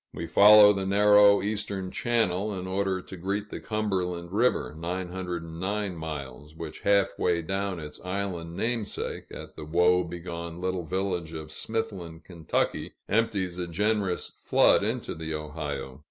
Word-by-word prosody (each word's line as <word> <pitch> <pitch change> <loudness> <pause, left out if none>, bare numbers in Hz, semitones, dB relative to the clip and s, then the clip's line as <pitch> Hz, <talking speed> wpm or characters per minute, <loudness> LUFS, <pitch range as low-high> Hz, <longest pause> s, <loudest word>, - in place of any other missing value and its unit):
We 85 - -4
follow 105 +3 +8
the 95 -1 -2
narrow 105 0 +6
eastern 100 -3 -3
channel, 105 -4 0
in 90 - -5
order 95 0 -1
to - - -9
greet 100 +4 -3
the - - -5
Cumberland 90 -5 -2
River 110 -6 +1
(909 90 +2 -3
miles), 75 -2 -7
which 80 -1 -7
half 100 -1 +2
way 85 -2 +1
down 95 +1 -2
its 75 -1 -9
island 90 -3 -3
name 115 +2 0
sake, 100 - -5
at - - -9
the - - -8
woe 90 +3 +3
begone 85 0 -6
little 90 -1 -2
village 90 -2 -2
of 80 -1 -7
Smithland, 95 -7 -4 0.5
Ky. - - -7
empties 100 -5 0
a 90 - -2
generous 100 +1 0
flood - - +4
into - - -2
the 80 0 -4
Ohio. 75 -3 -5
90 Hz, 145 wpm, -27 LUFS, 85-100 Hz, 0.5 s, follow